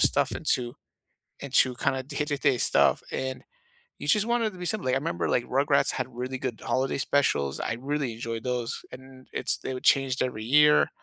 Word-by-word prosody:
stuff -, -, +3 dB
into 120 Hz, -1 st, -1 dB, 0.7 s
into 130 Hz, -2 st, +3 dB
kind 130 Hz, +2 st, 0 dB
of 130 Hz, 0 st, -5 dB
day-to 145 Hz, -1 st, -2 dB
day 135 Hz, -2 st, +2 dB
stuff, -, -, +3 dB
and 130 Hz, 0 st, -3 dB, 0.6 s
you -, -, -6 dB
just 210 Hz, -2 st, +4 dB
want 235 Hz, 0 st, +1 dB
it 220 Hz, -, 0 dB
to 185 Hz, -, -13 dB
be 180 Hz, -, -6 dB
simpler. 205 Hz, -7 st, -2 dB
Like, -, -, +2 dB
I -, -, +3 dB
'member, 165 Hz, +4 st, -2 dB
like, 120 Hz, -, +1 dB
Rugrats 140 Hz, +2 st, +2 dB
had -, -, -2 dB
really 130 Hz, +2 st, -4 dB
good 125 Hz, -3 st, -4 dB
holiday 130 Hz, +1 st, 0 dB
specials, 100 Hz, -, +1 dB
I 115 Hz, -, -2 dB
really 140 Hz, -3 st, -2 dB
enjoyed 115 Hz, -1 st, -5 dB
those, 125 Hz, -2 st, -3 dB
and 130 Hz, 0 st, -13 dB
it's -, -, +1 dB
they 130 Hz, -, -5 dB
were 130 Hz, -, -5 dB
changed 135 Hz, -1 st, +3 dB
every 110 Hz, -4 st, -3 dB
year. 150 Hz, +4 st, +5 dB
130 Hz, 200 wpm, -27 LUFS, 125-145 Hz, 0.7 s, year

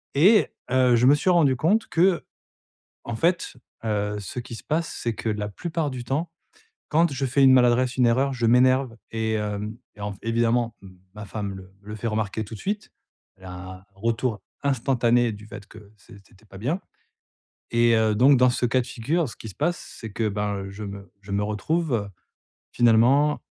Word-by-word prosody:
et 195 Hz, +10 st, +6 dB, 0.2 s
heu, 130 Hz, -2 st, +4 dB
je 120 Hz, +2 st, +3 dB
me 140 Hz, -, +7 dB
suis 145 Hz, -, 0 dB
rendu 160 Hz, -7 st, +4 dB
compte 205 Hz, -, +1 dB
qu'en 175 Hz, +1 st, 0 dB, 0.7 s
fait, 170 Hz, +7 st, 0 dB, 0.3 s
heu, 105 Hz, -1 st, -1 dB
ce 100 Hz, -, -7 dB
qui 120 Hz, 0 st, -9 dB
se -, -, -10 dB
passe, 160 Hz, +2 st, -1 dB
c'est 115 Hz, -2 st, -1 dB
que 110 Hz, -, -4 dB
la 105 Hz, -1 st, -2 dB
plupart 160 Hz, -, -3 dB
du 125 Hz, -2 st, -6 dB
temps, 150 Hz, +7 st, -2 dB, 0.6 s
quand 165 Hz, +1 st, +3 dB
je 135 Hz, 0 st, -1 dB
fais 135 Hz, +2 st, +2 dB
une 130 Hz, -1 st, +7 dB
maladresse, 125 Hz, 0 st, +3 dB
une 125 Hz, -, +4 dB
erreur, 130 Hz, +4 st, +2 dB
je 125 Hz, -2 st, -1 dB
m'énerve 130 Hz, +1 st, +3 dB, 0.2 s
et 110 Hz, -1 st, -1 dB
hem, 105 Hz, +1 st, -3 dB, 0.2 s
et 105 Hz, -, -12 dB
en 105 Hz, 0 st, -3 dB
f -, -, -14 dB
évidemment, 115 Hz, 0 st, +1 dB, 0.4 s
ma 105 Hz, -, -7 dB
femme 100 Hz, -1 st, -5 dB
le 95 Hz, -, -9 dB, 0.2 s
me 100 Hz, -, -20 dB
le 105 Hz, -, -5 dB
fait 110 Hz, +2 st, -4 dB
remarquer 110 Hz, 0 st, -2 dB
tout 110 Hz, -, -10 dB
de -, -, -11 dB
suite. 205 Hz, +1 st, -4 dB, 0.5 s
Elle 95 Hz, -, -15 dB
a 90 Hz, -, -7 dB
un 95 Hz, +1 st, -9 dB
retour 115 Hz, +1 st, -2 dB, 0.2 s
instantané 120 Hz, -3 st, +2 dB
du 105 Hz, 0 st, -10 dB
fait 105 Hz, -1 st, -10 dB
que 105 Hz, -1 st, -15 dB
c'est 100 Hz, -, -16 dB
c'était 100 Hz, +3 st, -23 dB
pas 95 Hz, -2 st, -13 dB
bien 145 Hz, -, -2 dB, 0.9 s
et 115 Hz, 0 st, +4 dB
heu, 110 Hz, -1 st, +2 dB
donc 135 Hz, +5 st, +6 dB
dans 125 Hz, 0 st, +5 dB
ce 125 Hz, -, -2 dB
cas 130 Hz, +2 st, +2 dB
de 120 Hz, -, -5 dB
figure, 155 Hz, +7 st, -1 dB
ce -, -, -10 dB
qui 110 Hz, -, -9 dB
se 100 Hz, -, -10 dB
passe, 175 Hz, +4 st, -3 dB
c'est 110 Hz, -, -7 dB
que, 110 Hz, +1 st, -1 dB
ben, 100 Hz, -1 st, -3 dB
je 105 Hz, +2 st, -8 dB
me 100 Hz, -2 st, -8 dB
je 100 Hz, 0 st, -9 dB
me 100 Hz, +1 st, +1 dB
retrouve, 110 Hz, +1 st, -1 dB, 0.6 s
finalement 125 Hz, +6 st, +4 dB
115 Hz, 200 wpm, -24 LUFS, 105-135 Hz, 0.9 s, me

